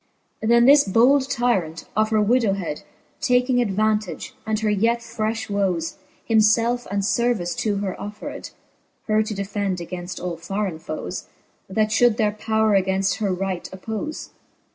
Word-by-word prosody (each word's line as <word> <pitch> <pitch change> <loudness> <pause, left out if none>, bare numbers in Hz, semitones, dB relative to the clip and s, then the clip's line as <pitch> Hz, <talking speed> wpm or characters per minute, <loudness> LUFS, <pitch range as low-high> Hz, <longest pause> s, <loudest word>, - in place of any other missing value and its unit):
Then 235 +2 +4
this 280 +2 +7
bold 260 +7 +3
tyrant, 190 -11 0
of 215 +1 +2
her 215 -1 +3
widowhed 200 -8 +1 0.4
Taking 250 -1 +3
advantage, 215 -2 -1
and 215 -1 0
her 215 - +1
yet 225 +4 +2
frefh 225 -1 -3
woes, 190 -5 -1 0.3
Himfelfe 230 +2 +3
and 200 0 -1
fervice 210 -6 0
to 210 -2 0
her 195 -2 -3
offered, 210 +1 -7 0.6
Her 215 -1 +2
to 215 -1 -3
defend 200 -1 -2
againft 175 +1 -6
all 175 -2 -4
forrein 185 -1 -3
foes, 155 - -5 0.4
That 215 +2 +1
fhould 230 0 +3
their 210 -1 +2
powre 215 -2 +2
againft 190 +1 0
her 205 -3 0
right 185 -1 -3
oppofe. 220 +11 -5
210 Hz, 140 wpm, -23 LUFS, 190-230 Hz, 0.6 s, this